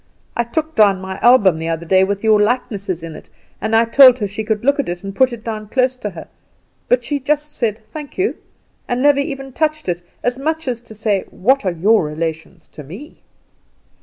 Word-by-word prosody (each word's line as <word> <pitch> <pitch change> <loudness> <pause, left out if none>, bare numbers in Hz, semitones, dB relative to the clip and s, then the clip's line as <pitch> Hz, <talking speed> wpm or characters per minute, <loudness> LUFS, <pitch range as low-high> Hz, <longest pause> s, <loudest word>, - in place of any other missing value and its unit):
I 235 - +1
took 315 +6 -3
down 200 -3 +4
my 190 0 -7
album 205 -9 +5
the 165 - -4
other 165 0 -3
day 185 +3 +4
with 200 +1 -2
your 215 -1 +4
likenesses 205 -6 -1
in 165 -1 -7
it, - - -13 0.3
and 220 +1 0
I 225 +1 +5
told 255 +1 +7
her 210 -4 -2
she 205 +3 -5
could 215 +1 -2
look 280 +1 +2
at 280 - -1
it, 175 +1 -5
and 195 0 -6
put 260 +2 +3
it 235 -2 -8
down 215 -2 -5
close 255 +1 +2
to 210 - -4
her; 170 -4 -10 0.6
but - - +2
she 290 -1 -2
just 295 +2 -1
said, 225 -2 -2
Thank 300 -2 -8
you, 385 +2 0 0.5
and 245 +1 -1
never 290 -1 +5
even 275 -2 -4
touched 310 -1 -1
it, 175 -1 -2 0.2
as 245 +1 -1
much 315 +2 -2
as 240 -2 -2
to 225 -2 -14
say 210 -2 -1
What 255 +2 +1
are - - +2
your 195 +5 +3
relations 160 +2 -5
to - - -10
me? 195 - -11
225 Hz, 220 wpm, -18 LUFS, 190-270 Hz, 0.6 s, told